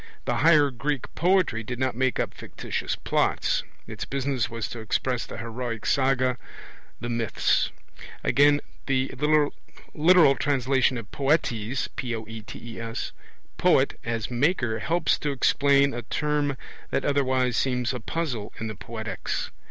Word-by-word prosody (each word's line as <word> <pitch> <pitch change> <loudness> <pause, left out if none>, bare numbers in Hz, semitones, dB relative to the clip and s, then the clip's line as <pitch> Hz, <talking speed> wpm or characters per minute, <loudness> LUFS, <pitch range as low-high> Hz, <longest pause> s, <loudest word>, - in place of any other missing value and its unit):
The - - 0
higher 150 -3 +5
Greek 140 +2 -3
poetry 180 -9 +2
did 125 +2 -5
not 130 -1 0
make 130 +1 +1
up - - -1
fictitious - - -4
plots; - - +1 0.2
its - - -6
business 135 -5 -1
was 115 -1 -3
to 120 - -6
express 115 +2 -1
the - - -7
heroic 115 0 -5
saga, 130 -2 +2 0.6
the - - -4
myths. 115 -3 +1 0.5
Again, 145 +1 +4 0.3
the 130 -1 +1 0.8
literal 160 -2 +6
translation 130 -2 +2
of 110 -3 -8
poetes, 135 -5 0 1.7
poet, - - +3
as 115 0 -3
'maker', 120 -3 +1
helps 170 0 +1
to 150 - -1
explain 140 +1 +3
a 120 - -3
term 145 +2 -1 0.3
that - - -1
otherwise 130 -3 +2
seems 125 -1 0
a 125 - -3
puzzle 120 -4 -3
in 115 - -3
the 110 - -6
Poetics. 110 +1 -4
130 Hz, 130 wpm, -26 LUFS, 115-145 Hz, 1.7 s, literal